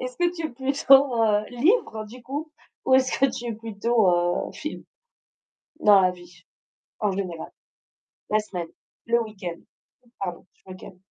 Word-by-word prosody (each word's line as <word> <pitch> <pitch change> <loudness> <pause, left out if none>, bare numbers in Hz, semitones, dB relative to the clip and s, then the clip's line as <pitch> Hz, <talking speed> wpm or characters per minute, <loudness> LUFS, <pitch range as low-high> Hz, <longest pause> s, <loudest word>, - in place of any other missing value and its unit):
est-ce 255 0 -5
que 350 0 +2
tu 330 -2 -3
es - - -9
plutôt, 270 -1 +4
heu, 210 -1 +3
livre 250 - +1
du 245 +3 -12
coup 290 +5 -5 0.3
ou 260 - +4
est-ce 260 -1 +3
que 275 - +5
tu 240 - -6
es 230 - -3
plutôt, 225 -1 +1
heu, 175 0 0
film? - - -6 1.0
Dans 205 -2 +7
la 185 -1 +3
vie 175 -1 -15 0.6
en 210 -2 +1
général, 185 -4 -5 0.8
la 215 - +4
semaine, 180 -5 -6 0.4
le 235 0 +3
week-end, 190 -6 -7 0.6
pardon, 180 -3 -5
je 190 - -19
me - - -9
calme. 185 0 -13
220 Hz, 160 wpm, -25 LUFS, 185-260 Hz, 1.0 s, Dans